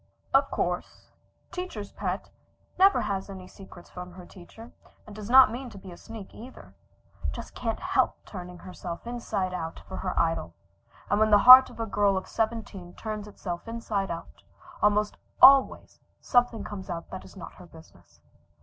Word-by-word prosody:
Of - - +4
course - - -4 0.4
"teacher's 360 - -6
pet" 190 -1 -4 0.5
never 390 +1 +5
has 200 -2 -3
any 190 -2 -9
secrets 185 -2 -14
from 180 0 -9
the 180 - -10
teacher, 215 +6 -14 0.3
and 210 - -12
does 210 0 -8
not 260 -3 +8
mean 250 +2 -6
to 215 - -12
be 190 -1 -11
a - - -10
sneak 225 -4 -11
either. 250 +4 -13 0.6
Just - - -8
can't - - -3
help - - +1
turning 180 -2 -9
herself 175 0 -8
inside 230 -6 -3
out 165 -2 -5
for 190 - -7
her 185 - -3
idol, 165 - -1 0.6
and 205 - +3
when 215 0 +4
the 210 - +7
heart 255 +1 +11
of - - -14
a 225 - -1
girl 200 -2 +1
of 190 - -5
seventeen 220 -6 -4
turns 215 -1 -6
itself 180 -2 -7
inside 220 -4 -3
out, 170 0 -8 0.4
almost 210 0 +2 0.2
always 270 +1 +6 0.2
something 245 -2 +1
comes 195 -2 -8
out 170 -1 -6
that 185 - -7
is - - -15
not 180 - -9
her 180 - -15
business. 160 - -19
200 Hz, 170 wpm, -27 LUFS, 180-225 Hz, 0.6 s, heart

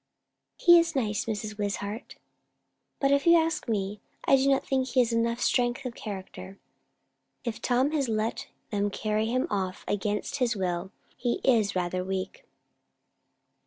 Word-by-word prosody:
"He 345 -1 +7
is 335 -2 0
nice, 215 -6 0
Mrs. 210 -1 -4
Wishart. 205 +1 -4 0.8
But 275 0 +2
if 280 +3 +2
you 335 0 +8
ask 325 -3 0
me, 205 -2 -2 0.2
I - - +6
do 270 +1 +3
not 270 - +2
think 265 -1 0
he 265 - +1
has 235 -1 0
enough 235 +1 +1
strength 245 +2 +1
of 250 - -3
character." 195 -2 -8 0.9
"If 235 -2 -4
Tom 255 +3 +2
has 285 -5 0
let 220 +1 -1 0.2
them 205 -1 0
carry 215 +2 -1
him 255 +3 +1
off 190 -2 -2
against 205 +5 -1
his 250 -3 +1
will, 185 -1 -2 0.2
he 240 -1 0
is 225 -7 +3
rather 180 0 -1
weak." 190 0 -4
225 Hz, 155 wpm, -28 LUFS, 200-260 Hz, 0.9 s, you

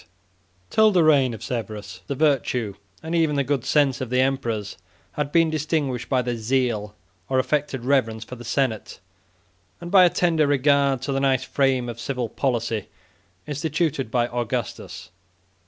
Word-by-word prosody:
] 90 -1 -39
Till 220 0 +5
the 180 -5 +3
reign 140 -5 +4
of 110 - -8
Severus, 105 -5 -5
the 140 - -2
virtue 130 -7 +1 0.3
and 160 +1 -4
even 160 -3 +2
the 140 - +2
good 135 -2 -1
sense 140 -4 +2
of 130 - -3
the 125 +1 +1
emperors 120 -6 -1 0.4
had 145 -1 -3
been 165 -1 +3
distinguished 150 -5 -1
by 130 -2 +2
their 120 0 -2
zeal 110 -3 -1 0.3
or 130 - +1
affected 135 -1 -1
reverence 115 -5 +1
for 125 - -9
the 120 - -11
senate, 120 -3 -2 0.8
and 170 0 -8
by 190 -2 +8
a 180 - +6
tender 165 -4 +2
regard 140 -1 +2
to 140 - -2
the 135 - 0
nice 135 -2 +2
frame 130 -2 +1
of 120 -1 -6
civil 125 -1 -3
policy 115 -5 -2 0.6
instituted 150 -2 -1
by 120 +1 +1
Augustus. 120 -1 -4
130 Hz, 165 wpm, -23 LUFS, 120-145 Hz, 0.8 s, by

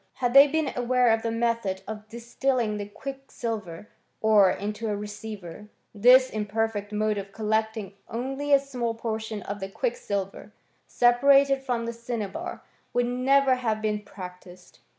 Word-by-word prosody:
Had 245 -2 -1
they 275 +1 +9
been 310 -1 -1
aware 250 0 +2
of 225 0 +2
the 230 - -2
method 230 -4 -1
of 215 0 -7
distilling 235 0 -1
the 205 -1 -5
quicksilver 225 -7 -6 0.3
ore 215 -3 +5
into 210 +4 -3
a 210 - 0
receiver, 205 -2 -8 0.3
this 250 +5 +6
imperfect 210 0 -2
mode 210 0 0
of 195 0 -8
collecting 220 -1 -1 0.2
only 270 +5 -3
a 280 - +9
small 250 -4 -3
portion 220 -2 -4
of 200 +1 -5
the 195 0 -5
quicksilver, 200 - -3 0.4
separated 275 +3 +4
from 245 -3 -2
the 235 - -3
cinnabar, 230 -4 -5 0.3
would 245 0 +2
never 260 +2 +3
have 230 -4 -1
been 210 -1 -1
practised. 180 -2 -12
225 Hz, 145 wpm, -26 LUFS, 210-250 Hz, 0.4 s, they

